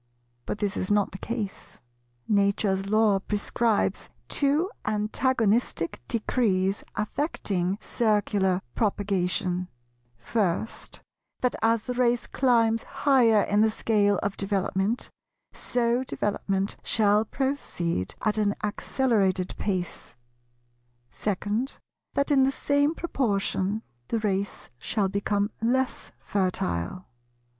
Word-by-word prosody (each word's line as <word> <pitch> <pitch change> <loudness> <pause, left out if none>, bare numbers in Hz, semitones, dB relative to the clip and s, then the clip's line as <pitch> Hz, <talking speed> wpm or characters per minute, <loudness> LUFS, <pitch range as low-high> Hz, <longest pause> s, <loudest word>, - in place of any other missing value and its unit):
But - - -2
this 205 -2 -1
is 185 - -1
not 205 -1 +2
the 190 - -8
case. 220 -3 -5 0.5
Nature's 200 -1 +2
Law 215 -1 +3
prescribes 210 +2 0 0.2
two 300 +7 +2
antagonistic 215 - 0
decrees 200 -4 +1
affecting 200 - -1
Circular 205 -5 +1
propagation; 185 -3 0 0.5
first, 185 - -2 0.4
that 250 - +1
as 225 -1 +3
the 250 - -3
race 245 -1 +2
climbs 230 -3 +2
higher 240 -7 +3
in 205 +1 +2
the 220 - +5
scale 205 -2 +2
of 200 -1 -1
development, 195 +2 -1 0.4
so 240 +1 0
development 200 -4 -1
shall 210 -1 +3
proceed 210 - -2
at 215 0 +1
an 205 -1 +2
accelerated 205 -4 +1
pace; 185 -4 -3 1.0
second, 210 +5 -2 0.4
that 280 +1 +1
in 275 -2 +5
the 265 - +3
same 285 +3 +1
proportion, 215 - 0 0.2
the 230 - 0
race 200 -2 -2
shall 195 - 0
become 200 +1 0
less 255 +3 0
fertile. 180 - -2
210 Hz, 100 wpm, -27 LUFS, 195-235 Hz, 1.0 s, the